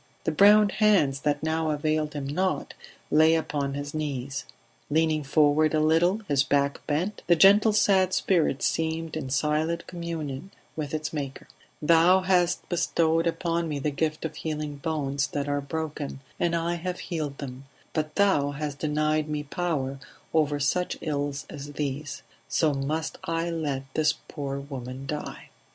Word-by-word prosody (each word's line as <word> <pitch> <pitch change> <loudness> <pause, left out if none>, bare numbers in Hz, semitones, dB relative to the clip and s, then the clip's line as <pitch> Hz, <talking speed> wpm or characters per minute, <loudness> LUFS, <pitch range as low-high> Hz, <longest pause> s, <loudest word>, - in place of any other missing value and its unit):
The - - 0
browned 205 +5 +6
hands 190 -12 +3
that 145 +1 -1
now 160 0 0
availed 155 0 0
him 145 -2 -3
not 185 +7 -1 0.4
lay 160 +2 +6
upon 145 -3 -2
his 145 0 -5
knees; 140 -3 -3 0.4
leaning 155 0 +2
forward 150 +2 +3
a - - +3
little, 165 +7 +3
his 140 -2 +3
back 140 0 +1
bent, 170 +8 -1
the 175 - +6
gentle 200 +5 +6
sad 190 -3 +3
spirit 165 -8 +1
seemed 160 0 -1
in 145 -4 -4
silent 155 +4 0
communion 165 -2 -5 0.3
with 155 -1 -3
its 155 +1 -3
maker 140 -3 -5 0.4
"Thou 170 +4 +5
hast 180 -2 +1
bestowed 165 -1 +1
upon 170 0 -1
me 150 - -2
the 145 +2 -1
gift 155 +2 -2
of 160 - -5
healing 150 -2 -4
bones 140 -2 -1
that 145 +1 -3
are 145 0 0
broken, 150 -1 -4 0.2
and 170 -1 +1
I 170 +1 -1
have 180 +1 -4
healed 155 -5 -4
them; 135 -1 -7 0.3
but 155 -1 -2
Thou 150 -9 +3
hast 145 -1 -4
denied 155 0 0
me 150 -1 -2
power 140 -4 -2 0.3
over 150 -2 +2
such 180 +6 0
ills 145 -3 -2
as 145 0 -8
these; 145 0 -4 0.3
so 155 -3 +2
must 150 +4 -2
I 165 +1 -1
let 145 -5 -2
this 155 -2 +2
poor 140 -2 -4
woman 135 -1 -7
die." 150 +1 -6
155 Hz, 155 wpm, -26 LUFS, 145-165 Hz, 0.4 s, browned